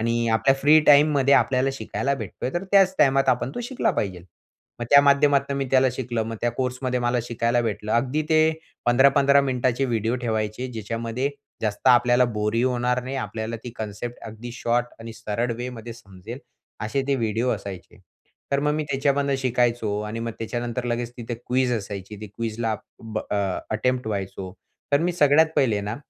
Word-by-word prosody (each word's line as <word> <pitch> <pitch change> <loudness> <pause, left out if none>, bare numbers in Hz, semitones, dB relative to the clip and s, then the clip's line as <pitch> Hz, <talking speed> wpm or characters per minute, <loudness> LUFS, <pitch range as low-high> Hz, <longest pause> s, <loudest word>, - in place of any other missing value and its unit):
आणि 115 +1 0
आपल्या 115 +4 +3
फ्री 150 +2 +6
टाईममध्ये 140 -2 +5
आपल्याला 135 0 +2
शिकायला 140 0 -2
भेटतोय 115 +1 -5
तर 175 +3 -2
त्याच 195 -2 +5
टाईमात 135 0 +4
आपण 125 +1 -1
तो - - -4
शिकला 250 +2 0
पाहिजे. 95 -4 -3 0.6
मग - - -1
त्या 140 - +9
माध्यमातून 140 -1 +3
मी 135 - 0
त्याला 130 -1 +4
शिकलं. 120 -3 -2
मग 115 0 -5
त्या 120 - +1
कोर्समध्ये 125 0 -2
मला 120 0 +1
शिकायला 120 0 0
भेटलं. 105 -1 -3
अगदी 130 +6 +1
ते 155 0 +5 0.5
15-15 140 +3 +5
मिनिटाचे 130 0 0
व्हिडिओ 115 0 0
ठेवायचे, 110 +2 -2
ज्याच्यामध्ये 115 +4 -3 0.3
जास्त 105 +4 -3
आपल्याला 120 0 +5
बोरही 110 0 -1
होणार 125 0 0
नाही. 135 +1 -4
आपल्याला 115 -2 -4
ती 120 - -5
कॉन्सेप्ट 110 +3 -5
अगदी 110 +2 -8
शॉर्ट 120 0 0
आणि 115 0 -8
सरळ 115 +2 -2
वे 125 +1 -4
मध्ये 115 -1 -8
समजेल 110 +2 -11 0.5
असे 110 +6 -1
ते 140 - +3
व्हिडिओ 115 +1 -1
असायचे. 100 -5 -6 0.6
तर 140 - +2
मग 150 0 +1
मी 155 - -1
त्याच्यामधून 140 0 +1
शिकायचो 120 -4 0
आणि 115 +2 -5
मग 115 -1 -3
त्याच्यानंतर 120 +2 -3
लगेच 120 0 -2
तिथे 120 0 -5
क्विज 125 +2 0
असायची 105 -2 -5
ती 105 - -6
क्विज 115 -1 -4
ला 110 -2 0 0.3
ब 110 -1 -5
अ, - - 0 0.4
अटेम्प्ट 125 +3 0
व्हायचो. 95 -3 -4 0.4
तर 140 - +4
मी 175 +2 0
सगळ्यात 155 -1 +5
पहिले 110 -6 +2
ना, 105 +3 -4
120 Hz, 175 wpm, -24 LUFS, 110-135 Hz, 0.6 s, त्या